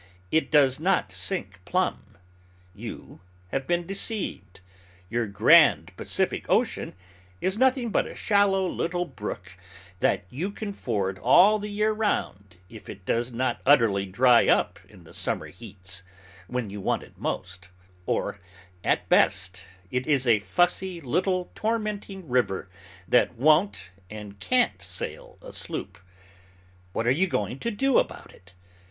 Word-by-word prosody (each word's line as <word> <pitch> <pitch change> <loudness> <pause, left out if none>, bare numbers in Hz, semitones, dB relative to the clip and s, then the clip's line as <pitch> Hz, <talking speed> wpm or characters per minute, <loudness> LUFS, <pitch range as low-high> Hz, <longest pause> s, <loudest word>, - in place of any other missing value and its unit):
It 160 - +2
does 140 -4 +4
not 160 - +1
sink 95 +2 -3
plumb. 110 - -2 0.6
You - - -9 0.3
have 135 +5 -3
been 175 0 0
deceived. 195 - -2 0.5
Your 120 -1 0
grand 100 - +5
Pacific - - -1
Ocean - - 0 0.4
is 190 +1 0
nothing 255 -3 +2
but - - +1
a - - -9
shallow 200 -2 +2
little 175 0 -2
brook, 105 - -7 0.4
that 95 - +1
you 165 +10 -3
can 205 0 -6
ford 100 - -2
all 210 +3 +6
the 210 +1 -5
year 210 +1 +1
round, 100 - -2
if 110 +2 -13
it 95 -2 -10
does 120 +4 0
not 130 +2 -1
utterly 115 -8 +4
dry 120 +5 +5
up - - +2
in - - -16
the - - -16
summer - - -2
heats, 95 -3 -8 0.5
when 125 -3 -3
you 100 0 -6
want - - -1
it - - -18
most; 90 0 -5 0.4
or, 100 0 -1 0.4
at - - +1
best, 90 -1 +2 0.2
it 125 0 -2
is 140 -4 +2
a 115 -3 +4
fussy 175 - 0
little 180 +6 -1
tormenting 210 -4 -3
river, 100 -7 0 0.4
that 125 - +3
won't 150 - +2 0.2
and 105 -2 -9
can't 95 -1 +1
sail - - -5
a - - -10
sloop. 95 -2 -5 0.9
What 115 - -2
are 120 - +4
you 175 +8 +2
going 120 - -2
to 235 - -2
do 265 +4 +2
about - - -4
it? 95 0 -20
125 Hz, 145 wpm, -26 LUFS, -, 0.9 s, all